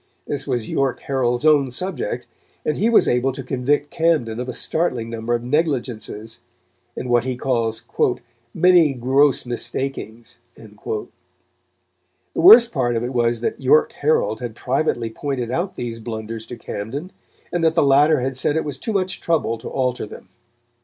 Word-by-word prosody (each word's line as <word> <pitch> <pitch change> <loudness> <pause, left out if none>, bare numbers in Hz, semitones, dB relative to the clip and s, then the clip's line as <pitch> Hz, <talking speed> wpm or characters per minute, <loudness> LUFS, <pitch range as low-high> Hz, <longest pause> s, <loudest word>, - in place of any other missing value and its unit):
This 145 0 -3
was 120 -5 -1
York 135 -2 -1
Herald's 130 0 -1
own 145 -4 +4
subject, 180 +3 -3 0.4
and 150 - 0
he 220 +4 +1
was 235 - +5
able 125 +2 +2
to 135 - -6
convict 135 +3 0
Camden 155 -9 +1
of 125 +1 -4
a - - -1
startling 125 -5 -1
number 115 +1 -1
of 120 - -4
negligences, 120 -6 -2 0.6
and 125 - -4
what 120 -1 +3
he 130 0 -2
calls 115 -3 -1 0.7
"many 170 -3 +4
gross 135 +3 +3
mistakings." 120 -1 -4 0.2
The 435 -2 -6 1.3
worst 245 - +8
part 120 -5 0
of 115 - -1
it 125 +2 -3
was 120 -1 +1
that - - -2
York 135 +4 +4
Herald 145 -7 0
had 120 -3 -6
privately 125 -3 -1
pointed 125 -2 -3
out 175 +8 -2
these 115 -2 -5
blunders 110 0 -6
to 120 - -8
Camden, 125 - -6 0.4
and 175 -1 0
that 160 0 +3
the 165 - +4
latter 145 +1 +4
had 130 +1 -2
said 145 +3 +1
it 160 - -1
was 140 -3 -5
too 220 - -3
much 185 -2 -1
trouble 150 -9 0
to - - -7
alter 125 -4 -1
them. - - -12
130 Hz, 165 wpm, -21 LUFS, 120-150 Hz, 1.3 s, worst